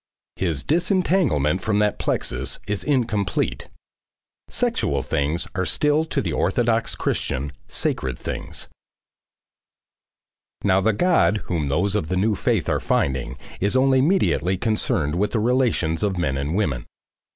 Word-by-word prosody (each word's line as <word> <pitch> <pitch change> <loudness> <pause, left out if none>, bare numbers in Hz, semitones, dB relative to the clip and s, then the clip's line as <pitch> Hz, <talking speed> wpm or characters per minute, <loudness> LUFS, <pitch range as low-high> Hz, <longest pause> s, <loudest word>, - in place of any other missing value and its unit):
His 80 -7 -1
disentanglement 160 - +2
from 105 -2 0
that 105 0 +1
plexus 65 +1 -1
is 105 0 -2
incomplete. 120 -8 0 0.8
Sexual 70 -1 0
things 75 +4 -1
are 95 - -1
still 150 - +2
to 150 -3 -1
the - - -2
orthodox 115 -2 +1
Christian, 70 +2 -2 0.2
sacred 65 -2 -2
things. - - -6 2.0
Now 95 -1 +3
the 110 - +3
God 165 - +2
whom 80 -5 -1
those 90 +8 +1
of 95 -7 -1
the 95 - -1
new 105 +3 +2
faith - - 0
are - - +1
finding 65 -1 -1 0.2
is 100 +5 +1
only 130 0 +4
mediately 135 - +2
concerned 95 -8 0
with 105 - 0
the 115 - +2
relations 115 -9 +1
of 100 -3 0
men 75 -6 0
and 70 +5 -2
women. 75 - -1
100 Hz, 135 wpm, -23 LUFS, 75-120 Hz, 2.0 s, only